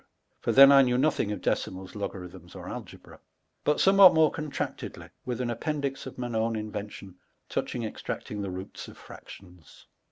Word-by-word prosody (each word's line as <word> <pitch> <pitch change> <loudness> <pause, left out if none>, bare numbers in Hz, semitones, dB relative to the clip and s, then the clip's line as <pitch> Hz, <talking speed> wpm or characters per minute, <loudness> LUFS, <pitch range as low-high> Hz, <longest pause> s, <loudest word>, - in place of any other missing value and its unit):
(for - - -1
then 135 +1 +9
I 140 -1 +8
knew 125 -2 +2
nothing 135 -6 +1
of 105 - -4
decimals, 95 0 -2
logarithms, 90 -3 -7
or - - -9
algebra,) - - -9 0.4
but 150 - +1
somewhat 195 -2 +7
more 160 -2 +5
contraetedly, 150 -3 -5 0.2
with 125 -1 -3
an 120 -2 -1
appendix 140 +2 -3
of 130 - -10
mine 120 -1 -4
owns 110 0 0
invention, 105 -3 -7 0.3
touching 120 - -3
extnurting 105 -1 -5
the 100 - -3
roots 95 +1 -7
of - - -13
fractions. 90 -3 -14
115 Hz, 160 wpm, -27 LUFS, 100-140 Hz, 0.4 s, then